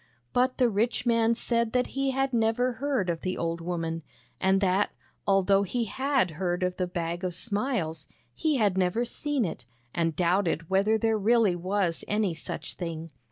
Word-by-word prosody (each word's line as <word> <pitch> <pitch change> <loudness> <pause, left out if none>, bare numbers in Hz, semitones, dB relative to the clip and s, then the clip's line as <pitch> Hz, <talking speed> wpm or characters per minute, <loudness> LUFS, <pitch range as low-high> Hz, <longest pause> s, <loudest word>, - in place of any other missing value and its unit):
But 255 +1 +2
the 250 - +4
rich 230 +3 0
man 230 -1 +3
said 235 -1 0
that 250 0 +3
he 275 0 0
had 270 0 0
never 235 +2 +2
heard 260 -5 -1
of 170 -2 -2
the 185 0 -2
old 165 0 -2
woman, 165 -1 -3 0.4
and 190 0 +3
that, 190 +1 +2 0.4
although 195 0 +4
he 215 +5 -1
had 265 - +1
heard 180 0 -1
of 180 0 -1
the 180 - 0
Bag 175 0 -3
of 180 -2 -1
Smiles, 200 - -2 0.3
he 310 - +1
had 200 -5 +2
never 185 +6 +1
seen 285 -1 -1
it, 130 -8 -6 0.3
and 165 -2 0
doubted 170 -1 +1
whether 200 +3 +3
there 225 -1 +1
really 220 -3 +4
was 185 -1 -1
any 210 -4 +1
such 160 - -5
thing. 165 -2 -5
195 Hz, 175 wpm, -28 LUFS, 175-235 Hz, 0.4 s, the